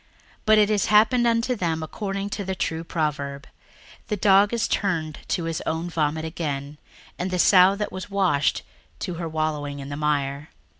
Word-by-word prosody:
61:002:022 - - -34 0.4
But 215 0 +6
it 210 -1 +4
is 205 -2 +2
happened 220 +3 +4
unto 230 +2 +1
them 165 -6 -1
according 195 +4 -4
to 200 - -3
the 190 0 -3
true 165 -2 -2
proverb, 150 -4 -3 0.6
The 210 -3 -2
dog 200 +1 +5
is 230 -1 0
turned 160 -6 -1
to 175 - -1
his 165 -1 -3
own 165 +2 -2
vomit 155 0 -1
again; 150 -3 -4 0.4
and 180 +1 -2
the 185 - -1
sow 185 +1 +6
that 210 +1 -3
was 185 +1 -7
washed 185 -8 +1 0.3
to 180 - -4
her 165 - -3
wallowing 155 -2 -2
in 140 0 -7
the 145 - -5
mire. 145 0 -1
170 Hz, 185 wpm, -24 LUFS, 150-200 Hz, 0.6 s, But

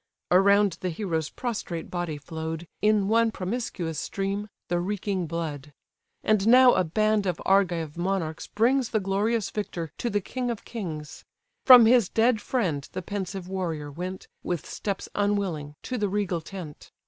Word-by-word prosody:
Around 195 0 +4
the 185 - -1
hero's 165 -3 -2
prostrate 210 -9 -4
body 175 -4 -3
flow'd, 160 +2 -5 0.2
In 210 -2 +3
one 230 +2 +4
promiscuous 185 - -3
stream, 200 +1 -3 0.2
the 175 0 0
reeking 190 -1 -2
blood. 150 -3 -5 0.5
And 215 -1 +2
now 250 +1 +8
a - - +3
band 215 +4 +1
of 175 -2 -1
Argive 175 -5 +2
monarchs 175 -3 -2
brings 245 +3 +2
The 220 - +1
glorious 200 +2 0
victor 175 -7 -4
to 240 - -1
the 205 -2 +1
king 250 +5 -4
of 235 -3 -4
kings. 160 -10 -6 0.4
From 250 -3 +11
his 230 -4 +5
dead 225 -1 +2
friend 180 - -1
the 185 - -4
pensive 190 -1 -4
warrior 165 -6 -3
went, 180 +5 -6
With 175 -3 -3
steps 200 -2 -4
unwilling, 195 -8 -1
to 250 -2 -3
the 205 -1 0
regal 190 -4 -1
tent. 165 -3 -9
195 Hz, 155 wpm, -26 LUFS, 165-215 Hz, 0.5 s, From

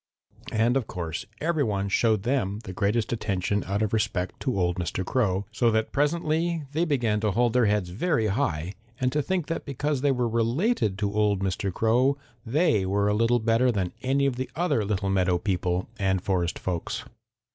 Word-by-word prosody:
And 115 +4 +2
of 125 - -2
course 85 -2 -5
every 160 -1 +1
one 100 -4 -1
showed 110 0 +2
them 120 -6 0
the 95 - -7
greatest 105 +5 0
attention 100 -2 -1
out 100 +2 0
of 105 - -2
respect 100 -4 -1
to 130 -7 -1
old 90 0 +1
Mr. 90 +1 -2
Crow, 100 -5 0
so 115 +2 +2
that 110 0 0
presently 160 +2 0
they 165 +3 +1
began 120 -9 +1
to 105 0 +1
hold 120 +3 +2
their 125 -3 +4
heads 105 -3 +1
very 115 - 0
high 90 -4 -1 0.3
and 125 0 +1
to 150 - +1
think 180 +1 -1
that 165 - -3
because 140 0 -2
they 145 0 +3
were 125 -2 +1
related 115 - +1
to 100 0 -1
old 105 -2 +2
Mr. 95 0 -1
Crow 125 +8 +2 0.3
they 145 - +2
were 100 +2 +1
a - - +2
little 115 +3 +3
better 115 +2 +2
than 95 -5 -2
any 135 +2 +1
of 135 -3 0
the 130 - -3
other 165 -9 +1
little 100 -1 -1
meadow 90 -2 +2
people 90 -1 -1
and 95 -1 +1
forest 90 -3 0
folks. 95 +5 -3
110 Hz, 190 wpm, -26 LUFS, 95-130 Hz, 0.3 s, their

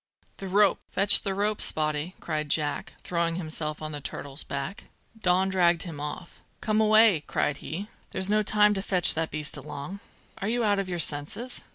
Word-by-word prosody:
"The 195 - -6
rope! 200 +2 +4
Fetch 200 +2 +5
the 195 -2 -1
rope, 210 +1 0
Spottie!" 155 +3 -1
cried 155 -2 -3
Jack, 145 -1 -1
throwing 170 -1 0
himself 155 -3 -2
on 155 - -4
the 145 -1 -6
turtle's 140 +1 -6
back. 140 +8 -5 0.3
Don 185 -1 +2
dragged 175 -3 +3
him 165 -6 -7
off. 150 +4 -7 0.2
"Come 215 0 +1
away!" 215 -6 +5
cried 145 - 0
he. 180 +8 -6 0.2
"There's 190 - -2
no 210 +1 +3
time 210 0 +4
to 195 - -2
fetch 185 -2 +3
that 160 0 -1
beast 150 -1 -2
along. 145 +6 -7 0.4
Are 200 - -2
you 240 +1 +1
out 205 -2 +2
of 195 -1 -3
your 175 - -2
senses?" 160 - -1
180 Hz, 185 wpm, -27 LUFS, 155-200 Hz, 0.4 s, Fetch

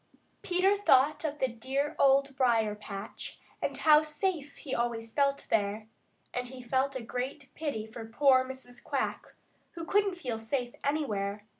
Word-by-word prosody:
Peter 370 +2 +3
thought 290 -7 +4
of 300 -1 -2
the 260 - +1
dear 265 +6 -2
Old 275 0 +4
Briar 230 -5 +3
patch 210 0 -7 0.2
and - - -1
how 305 -1 +6
safe 305 -1 -2
he 270 - -6
always 230 -1 -2
felt 280 -1 +1
there, 210 0 +1 0.5
and 250 0 -2
he 260 +1 -9
felt 260 +2 0
a 255 - -4
great 260 +4 -4
pity 285 -9 -3
for 220 +1 -8
poor 260 +2 +5
Mrs. 260 -2 -9
Quack, - - -3 0.4
who 335 -1 -6
couldn't 395 +1 +2
feel 250 -9 -3
safe 245 +2 -2
anywhere. 210 -9 -1
260 Hz, 155 wpm, -30 LUFS, 230-295 Hz, 0.5 s, how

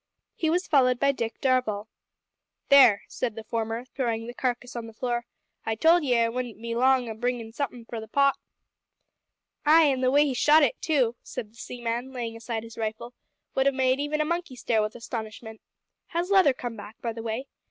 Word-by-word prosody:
He 320 - -1
was 355 +3 +1
followed 255 -4 +3
by 280 0 +4
Dick 230 -4 -4
Darvall. 250 -6 +1 0.8
"There," 255 -8 +7
said 235 -4 -3
the 225 - -7
former, 225 +2 -3
throwing 230 -3 -2
the 240 - -7
carcass 250 -1 -3
on 235 -1 -5
the 225 - -13
floor, 240 0 -2 0.4
"I 225 - -1
told 325 +7 +4
ye 250 -4 +2
I 230 - +3
wouldn't 240 -2 -4
be 230 0 -4
long 255 +1 +3
o' 225 - -4
bringin' 245 +1 -2
in 225 - -13
somethin' 245 -3 -4
for 230 0 -6
the 220 - -8
pot." 275 +4 +3 1.3
"Ay, 315 +2 +6
an' 270 -4 +2
the 255 - +3
way 290 +3 +5
he 275 - -1
shot 300 +5 +5
it 275 - 0
too," 255 -7 +1
said 210 - -7
the - - -26
seaman, 240 +2 -4
laying 235 -3 -4
aside 230 -1 -4
his 230 0 -11
rifle, 225 +2 -4 0.4
"would 265 +1 +2
have 275 - +2
made 260 0 +2
even 295 +1 -1
a - - +1
monkey 340 -4 -3
stare 230 -2 +1
with 215 0 -3
astonishment. 220 -1 -7 0.5
Has 345 +3 -2
Leather 375 -8 +6
come 245 -2 -6
back, 210 +1 -11
by 230 -1 -3
the 225 - -7
way? 230 +3 -3
245 Hz, 205 wpm, -26 LUFS, 225-270 Hz, 1.3 s, There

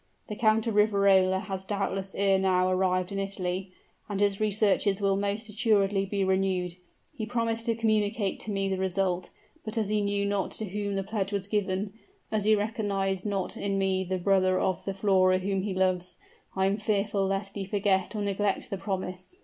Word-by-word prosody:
The 210 - -3
Count 215 0 +3
of 225 - -1
Riverola 200 -3 +4
has 190 -2 -5
doubtless 195 -1 -3
ere 195 -1 +3
now 185 -1 +2
arrived 185 0 +1
in 195 - -2
Italy; 190 -1 -3 0.4
and 200 -1 -2
his 200 -1 +2
researches 205 -1 +2
will 195 -1 +2
most 205 +3 -2
assuredly 205 -3 +1
be 200 0 -1
renewed. 190 -2 +1 0.4
He 220 -6 -4
promised 230 -1 -1
to 230 - +2
communicate 215 -2 0
to - - -6
me 195 -1 0
the 190 -1 -1
result, 185 -1 0 0.3
but 215 +1 -5
as 215 -3 0
he 210 0 +1
knew 200 0 0
not 200 -1 0
to 220 - -2
whom 200 +1 -3
that 195 -1 -2
pledge 200 -1 -2
was 200 -1 -2
given 200 -1 -1 0.4
as 215 -2 0
he 215 0 +6
recognized 200 -2 -1
not 195 -2 -2
in 195 -1 -1
me 190 -1 +1
the 185 0 -2
brother 185 0 +2
of 185 -2 0
the 195 - -3
Flora 190 -2 +3
whom 195 +1 -1
he 195 -1 -3
loves 185 -1 0 0.4
I 190 0 +2
am 195 +1 +1
fearful 205 -2 0
lest 195 0 -2
he 200 - -4
forget 195 0 0
or 210 - -1
neglect 200 0 -1
the 195 - -3
promise. 185 - -5
195 Hz, 190 wpm, -28 LUFS, 190-210 Hz, 0.4 s, he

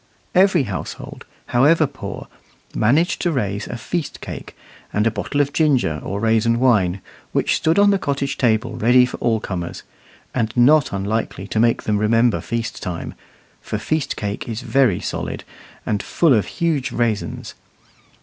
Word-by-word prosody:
Every 185 -4 +4
household, 100 -6 -6 0.2
however 150 +6 +4
poor, 130 -8 -7 0.5
managed 145 +11 +2
to 175 - +1
raise 100 -8 -2
a 120 - -5
"feast 155 +6 -4
cake" - - -8 0.3
and 105 +1 +1
a 115 - +3
bottle 145 +5 -1
of 145 0 -1
ginger 130 - +2
or 100 +2 -3
raisin 115 +1 +2
wine, 100 -8 +2 0.3
which - - +2
stood 160 +3 +1
on 205 0 +6
the 200 - +2
cottage 140 -3 -2
table 115 -1 +1
ready 125 +3 +5
for 125 - -6
all 115 -2 +1
comers, 90 -4 -5 0.5
and 115 -3 0
not 140 +4 +5
unlikely 100 0 -2
to 110 - -1
make 115 +1 +2
them 105 -1 0
remember 115 +2 +2
feast 115 -1 -4
time, 90 -4 -5 0.5
for 110 - -4
feast 150 +8 -1
cake 105 +7 -4
is 115 +1 -4
very 125 -8 +2
solid, - - -4 0.4
and 105 -2 -1
full 165 -5 +2
of 110 -4 +2
huge 150 -7 -1
raisins. 115 -3 -2
120 Hz, 160 wpm, -20 LUFS, 105-145 Hz, 0.5 s, on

